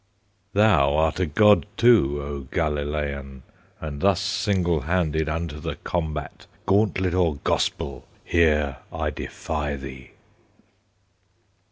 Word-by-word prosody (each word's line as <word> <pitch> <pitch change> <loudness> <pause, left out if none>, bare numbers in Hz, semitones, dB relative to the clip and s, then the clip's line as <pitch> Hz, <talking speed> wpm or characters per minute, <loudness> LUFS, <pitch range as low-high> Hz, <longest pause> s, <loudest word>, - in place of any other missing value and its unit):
Thou 80 -9 +4
art 80 +2 +1
a 90 - +1
God 105 +7 +4
too, 100 - +4
O 70 0 -5
Galilean! 75 -4 -2 0.4
And 75 -2 -6
thus 95 -1 +3
single 95 -4 0
handed 80 0 0
Unto 80 -1 -3
the 80 -1 -4
combat, 75 -2 -4 0.2
Gauntlet 95 -3 +2
or 85 -4 +2
Gospel, 70 -3 -1 0.2
Here 75 -5 +2
I - - -2
defy 75 -3 -4
thee! 65 -1 -10
80 Hz, 110 wpm, -24 LUFS, 70-90 Hz, 0.4 s, Thou